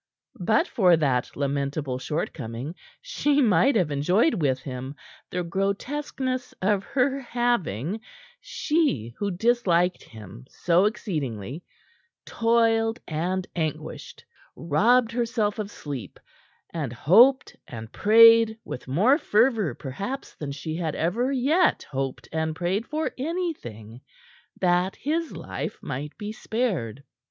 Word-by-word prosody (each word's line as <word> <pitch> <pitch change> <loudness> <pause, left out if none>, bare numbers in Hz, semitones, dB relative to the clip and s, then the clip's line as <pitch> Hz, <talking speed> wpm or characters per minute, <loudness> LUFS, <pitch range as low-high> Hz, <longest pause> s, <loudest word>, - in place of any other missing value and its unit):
But 215 +5 +2
for 180 -6 +4
that 135 -5 0
lamentable 140 -1 -2
shortcoming, 130 -2 -4 0.3
she 295 - +1
might 235 - +4
have 180 -8 +2
enjoyed 180 - +2
with 135 -3 +2
him 130 +1 -6 0.3
the 180 0 -2
grotesqueness 255 - -2
of 195 0 +1
her 270 +3 0
having 225 - -1 0.4
she, 290 - -1
who 205 - -1
disliked 185 -3 +1
him 105 - -12
so 175 +2 +2
exceedingly 150 - -3 0.6
toiled 225 0 +2
and 180 +4 -2
anguished, 160 -4 -5 0.3
robbed 225 - +3
herself 230 -3 -1
of 205 -1 -3
sleep, 145 - -7 0.5
and 150 -7 -3
hoped 225 - +5
and 110 -2 -8
prayed 225 +1 +6
with 125 - -7
more 210 - +3
fervor, 220 - +2
perhaps, 200 - -6
than 145 -2 -6
she 155 +3 -5
had 165 -3 -2
ever 230 +11 0
yet 295 +7 +2
hoped 135 -1 -4
and 160 0 -1
prayed 185 +6 -1
for 310 +1 -2
anything, 190 - -4 0.6
that 180 +1 +2
his 320 +3 -2
life - - -5
might 145 +3 -5
be 210 -1 -5
spared. 190 - -2
185 Hz, 115 wpm, -25 LUFS, 145-235 Hz, 0.6 s, prayed